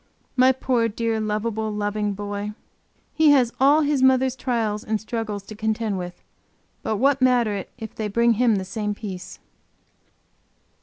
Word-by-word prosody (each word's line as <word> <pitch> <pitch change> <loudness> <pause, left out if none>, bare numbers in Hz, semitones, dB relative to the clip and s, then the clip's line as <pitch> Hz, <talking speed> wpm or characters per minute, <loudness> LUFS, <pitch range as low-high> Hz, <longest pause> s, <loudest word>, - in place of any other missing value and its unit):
My 255 0 +6
poor, 250 -3 +1
dear, 225 0 -1
lovable, 215 +1 -2
loving 210 0 -1
boy! 205 +1 -4 0.6
He 315 -1 +4
has 250 -4 +3
all 285 +4 +5
his 290 -2 +1
mother's 260 0 +4
trials 225 -5 -1
and 215 0 -1
struggles 215 -2 -4
to 215 - -10
contend 220 -2 -1
with; 180 0 -8 0.6
but 215 - -1
what 275 +3 +2
matter 245 -4 +3
it 195 - -5
if 220 -2 -8
they 215 - -3
bring 235 +3 +3
him 230 0 +3
the 190 -1 -2
same 210 +1 -3
peace? 190 -4 -7
220 Hz, 155 wpm, -23 LUFS, 210-250 Hz, 0.6 s, My